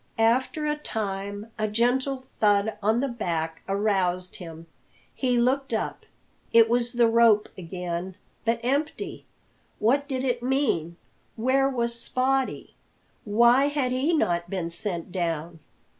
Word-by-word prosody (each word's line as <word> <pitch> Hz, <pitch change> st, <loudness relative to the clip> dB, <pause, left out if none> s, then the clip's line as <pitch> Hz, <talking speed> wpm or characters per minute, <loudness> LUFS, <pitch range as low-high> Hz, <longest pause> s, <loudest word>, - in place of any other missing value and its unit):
After 255 Hz, +8 st, +2 dB
a 300 Hz, 0 st, +1 dB
time 205 Hz, -3 st, -4 dB
a 215 Hz, -, +1 dB
gentle 255 Hz, +5 st, 0 dB, 0.2 s
thud 205 Hz, 0 st, +3 dB
on 220 Hz, +4 st, +2 dB
the 275 Hz, -, 0 dB
back 165 Hz, -9 st, -3 dB
aroused 190 Hz, -3 st, 0 dB
him. 165 Hz, -2 st, -9 dB, 0.5 s
He 250 Hz, -2 st, 0 dB
looked 260 Hz, +2 st, +1 dB
up. 220 Hz, -, -4 dB, 0.4 s
It 230 Hz, -1 st, +7 dB
was 240 Hz, +1 st, +1 dB
the 240 Hz, -1 st, +4 dB
rope 225 Hz, -2 st, +4 dB
again, 180 Hz, 0 st, -5 dB, 0.3 s
but 230 Hz, 0 st, +1 dB
empty! 285 Hz, +5 st, -2 dB, 0.5 s
What 275 Hz, +6 st, +2 dB
did 260 Hz, -2 st, -2 dB
it 245 Hz, -2 st, 0 dB
mean? 245 Hz, -, 0 dB, 0.4 s
Where 265 Hz, +4 st, +2 dB
was 235 Hz, -3 st, -1 dB
Spottie? 255 Hz, +3 st, -1 dB, 0.5 s
Why 235 Hz, +6 st, +5 dB
had 285 Hz, -3 st, 0 dB
he 260 Hz, +6 st, +1 dB
not 175 Hz, -, +1 dB
been 175 Hz, -3 st, -3 dB
sent 170 Hz, -1 st, -4 dB
down? 170 Hz, -2 st, -3 dB
230 Hz, 130 wpm, -26 LUFS, 190-255 Hz, 0.5 s, It